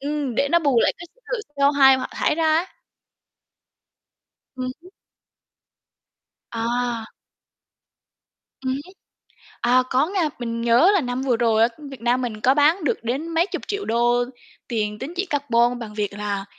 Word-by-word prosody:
ừm, 285 -2 -3
để 280 - +1
nó 340 - +5
bù 280 -7 +2
lại - - +3
cái 345 - -9 0.3
sự - - -1 0.2
CO2 280 -1 +5
họ - - -3
thải - - 0
ra 325 +1 0
á. 335 +3 +1 1.9
Ừm 255 0 -3
hứm. 365 +2 -16 1.6
À. 235 0 -2 1.5
Ừm 260 -1 -2
hứm. 285 +8 -6 0.7
À, 250 +1 +4
có 260 +3 +3
nha, 365 -4 0
mình 230 -1 -3
nhớ 240 +10 +5
là 395 - +3
năm 245 -1 -3
vừa 255 -3 +1
rồi 225 -2 +2
á, 230 - +6 0.2
Việt 265 -4 -10
Nam 245 +2 +1
mình 225 -4 -4
có 260 - +4
bán 305 +5 +3
được 285 - -1
đến 260 +8 -2
mấy 335 +1 +1
chục - - -5
triệu 405 0 -3
đô 240 +1 +2 0.4
tiền 210 -2 -2
tín 280 +6 -6
chỉ 375 +3 -1
carbon 245 -6 +1
bằng 220 -3 -7
việc 210 -1 -2
là 200 -1 -3
255 Hz, 165 wpm, -22 LUFS, 235-295 Hz, 1.9 s, á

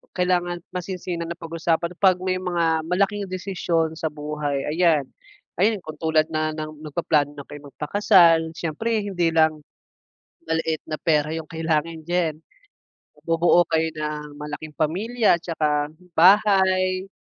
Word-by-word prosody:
Kailangan 180 -1 0 0.2
masinsinan 180 -2 -4
na 170 - -5
pag-usapan 165 0 -2
pag 190 -2 +5
may 185 0 -2
mga 170 -3 +1
malaking 195 +4 -1
desisyon 175 -4 -1
sa 160 0 -3
buhay 150 -2 -3
ayan. 160 -5 +3 0.6
Ayan 215 +2 +3
kung 155 - -8
tulad 160 -1 +2
na 155 0 0
ng 155 -1 -7
nagpaplano 150 -1 0
na 140 - -8
kay 145 0 -10
magpakasal 165 +2 +3
syempre 210 +7 -2
hindi 180 -4 0
lang, 155 -2 +2 0.8
maliit 160 -1 -1
na 155 - -3
pera 150 -1 +1
yung 160 -1 -5
kailangan 160 0 -2
diyan. 170 -2 0 0.9
Bubuo 170 +1 +4
kayo 160 0 +2
ng 150 -1 -5
malaking 150 +1 -7
pamilya, 205 +6 +1
tsaka 150 -3 -1 0.2
bahay 185 0 +4
165 Hz, 130 wpm, -23 LUFS, 155-180 Hz, 0.9 s, pag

